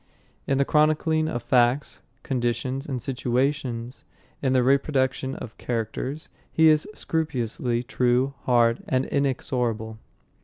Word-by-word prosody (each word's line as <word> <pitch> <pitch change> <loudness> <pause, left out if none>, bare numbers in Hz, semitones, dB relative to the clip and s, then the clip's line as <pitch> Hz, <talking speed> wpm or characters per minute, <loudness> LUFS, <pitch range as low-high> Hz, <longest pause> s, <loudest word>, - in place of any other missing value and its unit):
In 135 - +2
the 140 - +3
chronicling 155 +1 +2
of 120 -6 -3
facts, 125 +3 +2 0.2
conditions, 130 +1 -2
and 130 -3 -3
situations, 125 0 -2 0.4
in 130 - +1
the 130 -1 +3
reproduction 130 -1 +1
of 110 - -8
characters, 125 +5 -3 0.2
he 160 0 +5
is 155 -1 +3
scrupulously 125 -6 -2
true, 125 +2 +1
hard, 120 -2 +3
and 130 0 +1
inexorable. 120 -5 -1
130 Hz, 115 wpm, -25 LUFS, 120-140 Hz, 0.4 s, he